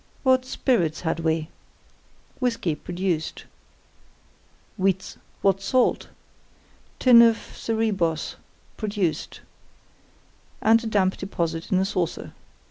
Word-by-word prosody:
What 260 -1 +3
spirits 175 - 0
had 165 -1 -1
we? 160 -1 -1 0.9
Whisky, 230 -10 0
produced. 175 0 -3 1.3
What 195 0 -1
salt? 250 +5 +1 0.9
Tin 245 -2 +7
of 230 -1 +5 0.2
Cerebos, 200 -8 -1 0.4
produced, 200 -6 -2 1.2
and 225 +2 +4
a - - -3
damp 195 -3 +1
deposit 165 -4 -3
in 190 - +3
a 190 - +2
saucer. 180 -4 -3
190 Hz, 90 wpm, -24 LUFS, 165-225 Hz, 1.3 s, Tin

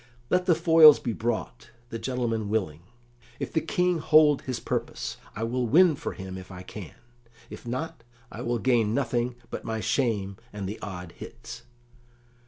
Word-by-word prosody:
Let 180 +1 +2
the 170 - +5
foils 160 -2 +8
be 120 - -3
brought, 110 - -3 0.2
the 115 - -5
gentleman 115 -4 -2
willing; 90 -8 -1 0.6
if - - -4
the 160 - +2
King 180 +1 +1
hold 150 -2 +5
his 125 -3 -4
purpose, - - -3 0.2
I 110 - -3
will 120 +1 -1
win 165 +5 +5
for - - -5
him 95 -1 -7
if 95 - -12
I 90 -1 -9
can; 95 -4 -9 0.6
if - - -10
not, 130 +1 -4 0.3
I - - -7
will 120 0 -1
gain 115 -2 +2
nothing 125 -2 0 0.2
but - - -5
my 110 0 -3
shame 105 -6 0
and 100 -2 -5
the 105 +3 -6
odd 90 -3 -7
hits." 115 +3 -10
115 Hz, 170 wpm, -27 LUFS, 105-140 Hz, 0.6 s, foils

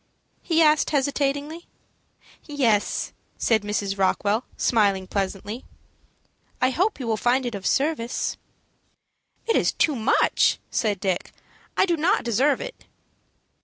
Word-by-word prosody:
he 330 -1 +3
asked, 305 -1 +4
hesitatingly. 285 +3 -1 0.8
"Yes," 240 -9 0 0.2
said 220 -2 +2
Mrs. 205 -1 -2
Rockwell, 205 +4 +1
smiling 200 -5 +2
pleasantly. 200 +4 -4 1.0
"I 255 - +2
hope 370 - 0
you 255 - -4
will 225 -1 0
find 250 +4 +1
it 240 - -3
of 195 -2 -4
service." 275 -5 0 1.1
"It 455 - +1
is - - +3
too 315 -4 +1
much," 230 +1 +2
said 210 -5 0
Dick. 190 -2 -2 0.5
"I - - +5
do 345 -3 +1
not 330 +3 +1
deserve 255 +5 +2
it." - - -8
245 Hz, 125 wpm, -24 LUFS, 210-295 Hz, 1.1 s, I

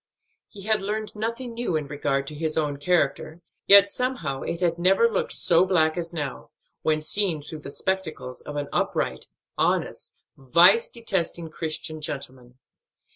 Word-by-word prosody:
He 200 - -12
had 215 0 +1
learned 210 +2 -4
nothing 230 +3 -4
new 235 -7 -2
in 155 -2 -1
regard 140 -1 -2
to 150 - -8
his 155 +1 -2
own 150 -3 0
character, 155 0 0 0.3
yet 200 0 +8
somehow 200 - -3
it 170 - -4
had 170 -2 0
never 195 +6 +4
looked 230 - 0
so 170 +1 +6
black 160 -4 +2
as 170 -1 -4
now, 150 -5 -5 0.3
when 155 -1 +1
seen 165 -1 0
through 155 +1 -7
the 145 - -9
spectacles 165 -7 -3
of 145 - -8
an 145 -1 -3
upright, 65 0 -1 0.3
honest, - - -1
vice 170 - +5
detesting 180 -7 -3
Christian 155 0 -4
gentleman. 130 -4 -7
165 Hz, 155 wpm, -24 LUFS, 150-195 Hz, 0.3 s, yet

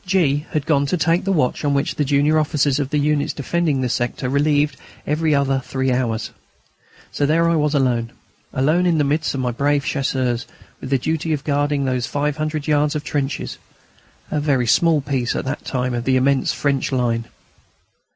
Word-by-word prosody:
G. 165 -6 +1
had 150 -2 -2
gone 145 -3 +2
to 180 - 0
take 165 +3 +1
the 195 - +1
watch 150 -8 0
on 145 -1 +1
which 140 - 0
the 150 - 0
junior 145 +2 +3
officers 145 -2 +1
of 140 -2 -2
the 150 - 0
units 145 0 +1
defending 150 -1 0
the 125 - 0
sector 125 +1 -2
relieved 145 +1 +2
each - - -21 0.4
other 140 -4 +2
every - - 0
three 130 0 -1
hours. 115 -3 -1 0.8
So 145 - 0
there 165 +3 +3
I 170 - +2
was 150 -1 +1
alone, 120 -4 +1 0.4
alone 155 +7 +2
in 170 -2 +2
the 150 - +3
midst 150 +1 0
of 135 - -2
my 125 -1 0
brave 140 +3 0
Chasseurs, 130 -4 -1 0.3
with 130 - -7
the 135 - +3
duty 160 +4 -1
of 145 - -3
guarding 145 -1 0
those 125 -2 -1
five 145 +2 -1
hundred 155 -1 -2
yards 150 0 +1
of 150 - -2
trenches 145 -2 -3 0.7
a 150 - 0
very 140 -4 +1
small 160 +5 +3
piece 135 -4 -1
at - - -3
that 135 +2 -4
time 125 -1 -2
of 120 0 -3
the 130 - +2
immense 135 +1 +2
French 140 -2 -1
line. 120 -3 0
145 Hz, 200 wpm, -20 LUFS, 130-150 Hz, 0.8 s, junior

